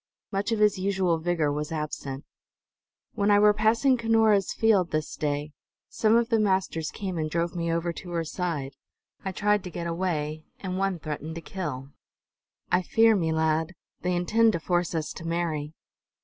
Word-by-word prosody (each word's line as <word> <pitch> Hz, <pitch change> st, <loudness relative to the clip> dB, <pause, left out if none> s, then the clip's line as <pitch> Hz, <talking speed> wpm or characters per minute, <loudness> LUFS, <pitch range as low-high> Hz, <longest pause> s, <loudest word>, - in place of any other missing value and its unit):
Much 200 Hz, +2 st, -1 dB
of 225 Hz, -, +1 dB
his 210 Hz, -2 st, +3 dB
usual 185 Hz, -3 st, +1 dB
vigor 160 Hz, -3 st, 0 dB
was 150 Hz, +1 st, -3 dB
absent. 150 Hz, -3 st, -4 dB, 0.9 s
"When 205 Hz, -1 st, +1 dB
I 205 Hz, -, +6 dB
were 210 Hz, 0 st, +6 dB
passing 225 Hz, +5 st, +3 dB
Cunora's 220 Hz, -4 st, +3 dB
field 205 Hz, -6 st, +3 dB
this 155 Hz, -1 st, -2 dB
day, 145 Hz, 0 st, -2 dB, 0.4 s
some 220 Hz, 0 st, +2 dB
of 235 Hz, 0 st, +3 dB
the 225 Hz, -2 st, +3 dB
masters 190 Hz, -6 st, 0 dB
came 185 Hz, -4 st, -4 dB
and 155 Hz, 0 st, -1 dB
drove 170 Hz, +2 st, -1 dB
me 170 Hz, -1 st, -1 dB
over 170 Hz, +1 st, -1 dB
to 175 Hz, -, -9 dB
her 170 Hz, -1 st, -1 dB
side. 160 Hz, -5 st, -3 dB, 0.5 s
I 190 Hz, -, -2 dB
tried 210 Hz, +1 st, +1 dB
to -, -, -4 dB
get 170 Hz, -1 st, -5 dB
away, 160 Hz, -3 st, -2 dB, 0.2 s
and 185 Hz, -1 st, -3 dB
one 195 Hz, -2 st, 0 dB
threatened 155 Hz, 0 st, -5 dB
to 165 Hz, -, -6 dB
kill. 145 Hz, -7 st, -5 dB, 0.8 s
I 180 Hz, -, +4 dB
fear 225 Hz, +4 st, +4 dB
me, 165 Hz, -5 st, 0 dB
lad, 160 Hz, +2 st, 0 dB, 0.3 s
they 180 Hz, 0 st, 0 dB
intend 220 Hz, +6 st, +3 dB
to 170 Hz, -, -1 dB
force 175 Hz, 0 st, 0 dB
us 155 Hz, -1 st, -2 dB
to -, -, -9 dB
marry!" 165 Hz, -3 st, -2 dB
175 Hz, 175 wpm, -27 LUFS, 160-200 Hz, 0.9 s, I